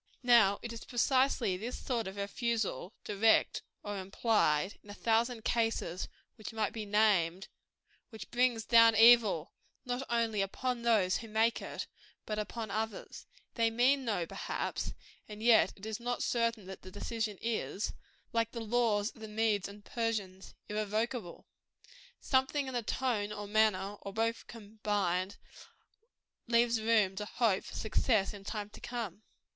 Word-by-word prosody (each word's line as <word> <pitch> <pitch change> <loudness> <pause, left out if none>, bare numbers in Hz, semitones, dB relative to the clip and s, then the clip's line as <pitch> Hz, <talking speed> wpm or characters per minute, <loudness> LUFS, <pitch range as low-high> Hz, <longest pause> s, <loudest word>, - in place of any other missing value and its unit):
Now 225 -5 +6
it 235 -1 -5
is 230 - -8
precisely 255 -4 +2
this 230 +6 -5
sort 235 -5 -2
of 190 - -6
refusal, 205 - -2
direct 215 +2 +3 0.2
or 205 -1 -4
implied, 190 -3 +1
in 205 - -17
a 205 - -8
thousand 230 +1 0
cases 225 -6 0 0.3
which 215 - -7
might 215 -3 -1
be 215 -2 -5
named, 195 -4 +2 0.6
which 220 -3 -10
brings 240 -2 +2
down 230 -1 +7
evil, 225 -7 +6 0.3
not 245 +1 -2
only 230 -3 +1
upon 245 +5 -2
those 215 -6 +3
who 225 - -8
make 220 +2 +1
it, - - -5 0.4
but 215 0 -3
upon 215 0 -4
others. 220 0 -4 0.3
They 230 -1 +2
mean 255 +4 +3
no, 205 -8 -1
perhaps; - - -4 0.3
and 210 +1 -8
yet 235 -1 +6
it 200 - -10
is 220 0 -4
not 245 +1 -2
certain 230 -3 0
that 190 0 -9
the 185 - -10
decision 215 +1 -3
is 225 -2 -2 0.4
like 230 0 0
the 235 - -4
laws 225 -2 +1
of 225 - -18
the 220 - -6
Medea 210 -2 0
and 205 0 -15
Persians 210 -5 -3
irrevocable. 215 -1 -3 0.7
Something 265 +1 +1
in 260 - -5
the 240 - 0
tone, 220 -3 -1
or 210 -1 -5
manner, 205 -1 +1
or 200 - -7
both 225 +1 -1
combined, 205 -4 -2 1.1
leaves 235 -1 +3
room 215 -4 +3
to 210 - -3
hope 210 -3 +1
for - - -9
success 215 -2 +1
in 200 -1 -10
time 210 0 -5
to - - -13
come. 230 -5 -5
220 Hz, 150 wpm, -32 LUFS, 205-235 Hz, 1.1 s, down